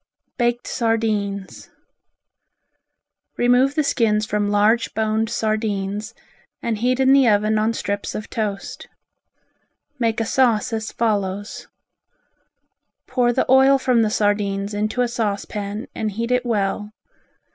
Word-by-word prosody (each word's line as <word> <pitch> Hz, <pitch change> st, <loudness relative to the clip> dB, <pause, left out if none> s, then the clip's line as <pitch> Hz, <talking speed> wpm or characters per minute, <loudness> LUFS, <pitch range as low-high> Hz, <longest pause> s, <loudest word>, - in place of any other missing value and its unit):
Baked 240 Hz, -1 st, 0 dB
Sardines 215 Hz, -4 st, -2 dB, 1.7 s
Remove 250 Hz, +3 st, +3 dB
the 305 Hz, -, +2 dB
skins 225 Hz, -6 st, +1 dB
from 210 Hz, -1 st, -1 dB
large 210 Hz, +3 st, +2 dB
boned 220 Hz, 0 st, 0 dB
sardines 215 Hz, -2 st, -2 dB, 0.4 s
and 225 Hz, -3 st, -2 dB
heat 250 Hz, +2 st, +1 dB
in 265 Hz, 0 st, +5 dB
the 275 Hz, -2 st, +5 dB
oven 215 Hz, 0 st, +2 dB
on 220 Hz, +1 st, +1 dB
strips 200 Hz, -2 st, -3 dB
of 215 Hz, -, -5 dB
toast. 210 Hz, -3 st, -4 dB, 1.1 s
Make 230 Hz, -2 st, 0 dB
a 225 Hz, -, 0 dB
sauce 235 Hz, -3 st, +2 dB
as 220 Hz, 0 st, -3 dB
follows: 205 Hz, -3 st, -2 dB, 1.4 s
Pour 245 Hz, -2 st, +1 dB
the -, -, +1 dB
oil 265 Hz, +1 st, +6 dB
from 255 Hz, -3 st, +2 dB
the 220 Hz, -, +2 dB
sardines 205 Hz, -1 st, 0 dB
into 215 Hz, +4 st, -1 dB
a -, -, +1 dB
saucepan 210 Hz, -2 st, -3 dB
and 215 Hz, -, -2 dB
heat 230 Hz, +4 st, -3 dB
it 250 Hz, 0 st, +1 dB
well. 210 Hz, -1 st, -1 dB
220 Hz, 125 wpm, -21 LUFS, 205-240 Hz, 1.7 s, oil